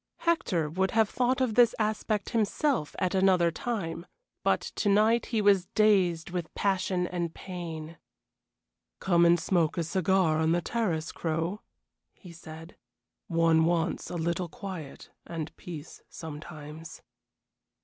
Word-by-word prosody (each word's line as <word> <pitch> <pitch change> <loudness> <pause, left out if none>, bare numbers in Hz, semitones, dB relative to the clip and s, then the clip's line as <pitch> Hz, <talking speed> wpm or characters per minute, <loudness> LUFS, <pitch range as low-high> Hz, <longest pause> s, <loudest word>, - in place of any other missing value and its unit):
Hector 205 - +1
would 190 +5 0
have 220 -2 +4
thought 255 +1 +1
of 250 -4 +1
this 235 0 +5
aspect 215 -1 -1
himself 230 - 0
at 185 0 0
another 185 -3 +4
time, 170 -4 -4 0.4
but - - +2 0.2
to 205 - +1
night 220 +3 +3
he 220 -3 0
was 195 -3 +4
dazed 185 -6 +3
with 175 -3 -4
passion 185 -2 0
and 175 -2 -3
pain. 165 -3 -7 1.0
"Come 170 -2 +4
and 170 0 +5
smoke 170 -2 +1
a 170 - +1
cigar 185 -1 +2
on 160 +1 +2
the 175 - +1
terrace, 170 -9 -1
Crow," 165 +5 -2 0.5
he 180 - -13
said. 165 +1 -11 0.5
"One 165 -3 +3
wants 170 0 0
a - - -5
little 170 +1 -1
quiet 185 - -8 0.2
and 165 -3 -5
peace 160 -3 -9
sometimes." 155 0 -9
175 Hz, 135 wpm, -28 LUFS, 165-200 Hz, 1.0 s, this